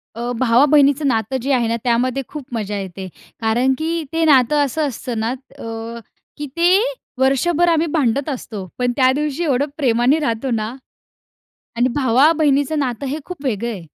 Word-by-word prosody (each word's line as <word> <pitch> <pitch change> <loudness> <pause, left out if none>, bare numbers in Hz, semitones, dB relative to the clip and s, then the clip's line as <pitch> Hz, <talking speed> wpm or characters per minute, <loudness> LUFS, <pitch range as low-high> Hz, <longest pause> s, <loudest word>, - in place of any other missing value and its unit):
अ, 240 +1 -3
भावा-बहिणीचं 280 +3 +4
नातं 225 +1 0
जे 275 +4 -2
आहे 240 -3 +2
ना 230 - 0
त्यामध्ये 250 +2 0
खूप 300 -3 -7
मजा 210 -3 -3
येते, 190 0 -7 0.3
कारण 240 +4 +2
की 330 +2 -2
ते 325 0 +1
नातं 290 0 +4
असं 295 +2 -1
असतं 245 -2 -5
ना, 225 +2 -1
अ, 230 -3 -7 0.4
की 295 - -4
ते 355 +3 +5 0.4
वर्षभर 295 +6 +2
आम्ही 330 0 +2
भांडत 280 -1 +1
असतो. 220 -8 -6
पण 245 0 0
त्यादिवशी 280 +4 +1
एवढं 280 -3 +1
प्रेमाने 255 +1 +2
राहतो 260 -3 -2
ना 220 -2 -1 1.1
आणि 245 +2 +3
भावा-बहिणीचं 285 +2 +3
नातं 255 -2 -2
हे 280 +3 -2
खूप 360 -6 -9
वेगळं 235 -1 -1
आहे. 190 -7 -8
260 Hz, 160 wpm, -19 LUFS, 230-295 Hz, 1.1 s, ते